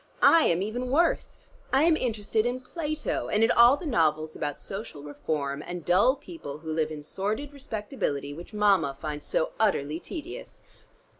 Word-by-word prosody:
I 330 -1 +7
am 175 +2 +2
even 245 +4 -3
worse. 330 +6 +1 0.3
I 270 +3 +4
am 330 -1 +5
interested 220 -5 0
in 250 +1 -2
Plato, 310 +1 -3
and 210 +1 +2
in 225 - +4
all 240 +4 +7
the 340 - -8
novels 155 - +1
about 145 -1 -3
social 195 -7 -7
reform 145 -1 -3
and 175 -2 -6
dull 200 +9 +4
people 290 - -8
who 160 0 -5
live 155 -1 0
in 150 -1 -7
sordid 215 - -3
respectability, 210 - -3
which 170 +4 -10
Mama 200 -10 +2
finds 150 -1 -5
so 160 - 0
utterly 160 -8 +1
tedious." 340 - -8
205 Hz, 165 wpm, -27 LUFS, 155-260 Hz, 0.3 s, I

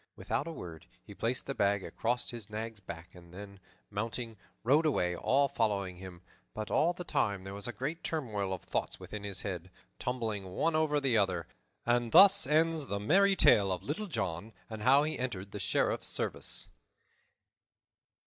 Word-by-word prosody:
Without 145 - -2
a - - -4
word, 85 - -9 0.2
he - - -11
placed 125 +3 -2
the 135 - -3
bag 100 -4 +1
across 120 +2 -1
his 115 -4 -6
nag's 110 +1 -5
back 85 -3 -9
and 85 -1 -15
then, 100 +1 -10 0.3
mounting, 115 +2 -3 0.3
rode 145 +7 +4
away, 90 -11 +1
all 140 +10 +2
following 100 -7 -1
him; 90 -1 -10 0.3
but 110 - -4
all 170 - +3
the 180 0 -6
time 100 - 0
there 95 0 -7
was 100 +2 -5
a - - -2
great 135 +9 -4
turmoil 110 - -2
of 95 - -4
thoughts - - -3
within 105 -1 -7
his 100 -2 -4
head, 90 -3 -4 0.3
tumbling 110 -7 -3
one 165 -1 +1
over 155 -2 +2
the 130 -5 +2
other. 90 -4 0 0.4
And 120 -1 +1
thus 195 +3 +8
ends 160 -1 +2
the 100 - -2
merry 195 - +4
tale 100 - +5
of 90 - -3
Little 185 +9 -3
John 95 - -3 0.2
and 110 -1 -6
how 135 +5 +5
he 155 +1 -2
entered 100 -6 -4
the - - -6
Sheriff's - - +1
service. - - -2
110 Hz, 175 wpm, -32 LUFS, 95-140 Hz, 0.4 s, thus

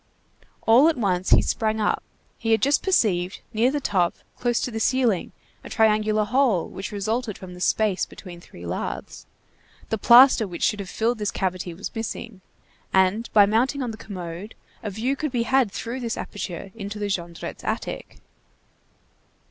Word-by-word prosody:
All 240 +7 +7
at 320 - -1
once 185 -5 0
he - - +6
sprang 220 -1 0
up; 210 - +1 0.4
he 225 -1 +1
had 220 - +2
just 280 +2 +3
perceived, 190 - +1
near 225 +3 +3
the 290 +2 -1
top, 185 -9 +1 0.2
close 240 -1 0
to 250 - -2
the 225 - -3
ceiling, 240 -5 +1 0.3
a - - -9
triangular 215 -1 +2
hole, 225 -5 +2
which 195 - -7
resulted 215 +2 -2
from 185 -1 -10
the 180 - -11
space 210 -1 +1
between 175 -3 -11
three 85 - -12
lathes. 85 +1 -5 0.6
The 220 - -1
plaster 240 -1 +7
which 175 -2 -6
should 210 - +2
have 195 -2 -6
filled 230 +1 0
this 210 -1 -1
cavity 185 -2 -3
was 200 - -7
missing, 225 -2 -5 0.5
and 190 +5 +2
by 205 -2 +7
mounting 250 +7 +1
on 240 - -3
the - - -7
commode, 185 -1 -8 0.3
a 210 - -4
view 230 +7 -1
could 300 0 -3
be 240 -2 0
had 260 -3 +2
through 235 +6 -5
this 235 -3 -3
aperture 195 -1 -6
into 210 -1 -6
the 210 - -2
Jondrettes' 175 -4 -5
attic. - - -4
215 Hz, 170 wpm, -24 LUFS, 190-235 Hz, 0.6 s, All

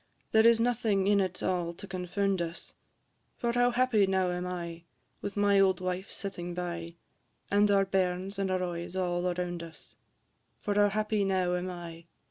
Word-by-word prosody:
There 220 +1 +6
is 230 -1 +5
nothing 230 -5 +1
in 200 0 +4
it 185 -1 -3
all 175 -2 0
to 200 - -10
confound 190 0 -1
us: 170 0 -5 0.6
For 235 - 0
how 245 0 +4
happy 240 -5 +3
now 190 -1 +1
am 180 0 -3
I, 170 -2 -5 0.4
With 200 - -5
my 205 -1 +4
old 190 -2 +4
wife 185 +1 -3
sitting 175 -3 -5
by, 170 -1 -4 0.6
And 205 +1 +4
our 195 -1 +4
bairns 190 +1 -1
and 195 -1 0
our 185 0 0
oys 175 0 -4
all 175 -1 0
around 175 -1 -3
us; 165 -1 -11 0.6
For 205 - -1
how 205 0 +4
happy 215 0 0
now 185 -2 +1
am 180 +1 -2
I, 175 -2 -6
&c. 170 - -21
185 Hz, 180 wpm, -30 LUFS, 175-205 Hz, 0.6 s, There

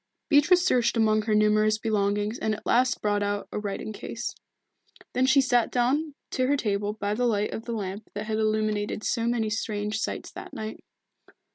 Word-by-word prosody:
Beatrice 350 +5 +5
searched 245 -8 +2
among 215 -1 +3
her 215 0 0
numerous 215 0 +3
belongings 210 0 0
and 215 0 0
at - - -12
last 250 +1 +2
brought 205 -1 +1
out 205 0 -2
a - - -2
writing 210 +1 -4
case. - - -5 0.8
Then 255 +1 +2
she 270 +1 +6
sat 245 -3 +2
down 280 +5 +1 0.2
to 255 0 +1
her 285 +1 +2
table 205 -3 -1
by 205 -1 -2
the 245 +3 +1
light 210 -2 0
of 225 - -6
the 235 - -3
lamp 200 -1 -5
that 205 +1 -3
had 215 0 -1
illuminated 215 -1 0
so 230 0 0
many 230 -3 0
strange 210 -1 -2
sights - - -4
that - - -9
night. 215 0 -6
215 Hz, 185 wpm, -26 LUFS, 210-245 Hz, 0.8 s, she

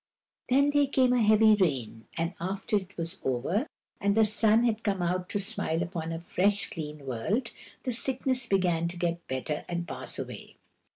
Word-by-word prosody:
Then 280 +3 +4
there 290 -1 +3
came 260 -2 +3
a 250 - +3
heavy 215 0 +6
rain, 130 - 0
and 165 +2 -1
after 195 +4 -2
it 195 0 -7
was 170 +3 -3
over, 140 - 0 0.3
and 200 0 +2
the 220 - +6
sun 215 +2 +3
had 225 -2 +1
come 195 -5 0
out 180 +1 -1
to 205 - -1
smile 190 -5 -1
upon 165 -2 -4
a 165 - -3
fresh, 195 +4 0
clean 150 -3 -6
world, 195 - -1 0.3
the 255 - -1
sickness 255 +1 +1
began 175 -4 +2
to 175 +1 -6
get 170 0 -2
better 130 +3 -3
and 170 0 -3
pass - - -6
away. - - -7
190 Hz, 180 wpm, -29 LUFS, 165-220 Hz, 0.3 s, heavy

